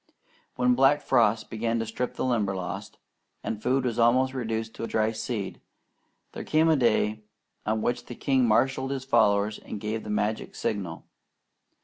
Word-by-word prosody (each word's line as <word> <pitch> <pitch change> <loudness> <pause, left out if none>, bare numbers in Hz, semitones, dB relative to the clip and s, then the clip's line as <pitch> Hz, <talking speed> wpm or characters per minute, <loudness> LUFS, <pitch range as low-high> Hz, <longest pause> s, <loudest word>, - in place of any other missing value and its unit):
When 125 0 +3
black 135 +3 +4
frosts 115 -3 +3
began 115 +1 -2
to 115 - -1
strip 115 +3 -3
the - - -2
Limberlost, 100 -7 -2 0.5
and 110 -1 -4
food 130 +2 +1
was 120 -2 -1
almost 130 +3 +4
reduced 115 -3 -3
to 115 - -5
dry 110 0 +1
seed, 110 -2 -4 0.7
there - - -6
came 160 +1 +3
a 160 - +5
day 110 -4 +2 0.5
on 110 0 0
which 120 0 -1
the 120 - -7
king 130 -2 +2
marshalled 130 +4 +2
his 135 -1 -3
followers 105 -4 +3
and 105 - -7
gave 110 +2 -3
the - - -8
magic 105 +1 -1
signal. 95 -6 -3
115 Hz, 160 wpm, -27 LUFS, 110-130 Hz, 0.7 s, a